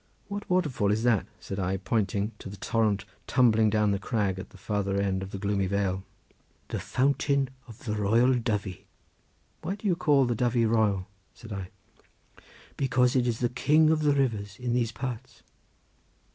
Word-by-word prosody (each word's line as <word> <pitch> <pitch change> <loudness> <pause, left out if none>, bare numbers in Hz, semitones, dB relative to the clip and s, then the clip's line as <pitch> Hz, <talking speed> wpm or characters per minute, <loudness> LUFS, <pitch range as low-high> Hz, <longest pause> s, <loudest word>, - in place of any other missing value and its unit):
"What 205 0 -5
waterfall 150 - +1
is 110 +2 0
that?" 120 -5 +2
said 95 - -6
I, 95 0 0
pointing 105 +1 -1
to - - -8
the 100 - -9
torrent 105 -1 0 0.2
tumbling 110 -4 +4
down 105 -1 +2
the 100 - 0
crag 100 -3 -1
at - - -8
the - - -15
farther 100 -1 -1
end 95 -1 0
of 95 - -5
the 100 - -6
gloomy 100 -1 0
vale. 95 -1 -1 0.7
"The - - -2
fountain 140 0 +1 0.2
of 120 +5 -13
the 105 - -1
Royal 115 +5 +3
Dyfi." 105 -6 -2 0.8
"Why 195 - -3
do 205 - -14
you 185 -4 +3
call 145 -6 +3
the 120 - 0
Dyfy 120 0 +2
royal?" 105 -4 +2 0.3
said 115 -2 -9
I. 95 -2 -5 1.1
"Because 125 -1 +2
it 125 -1 +3
is 115 -1 -1
the 120 - +2
king 155 +5 +4
of 160 -1 +2
the 145 -1 +3
rivers 105 -8 -1
in 125 -2 -2
these 120 -2 +1
parts." 125 +1 -6
110 Hz, 175 wpm, -28 LUFS, 100-130 Hz, 1.1 s, tumbling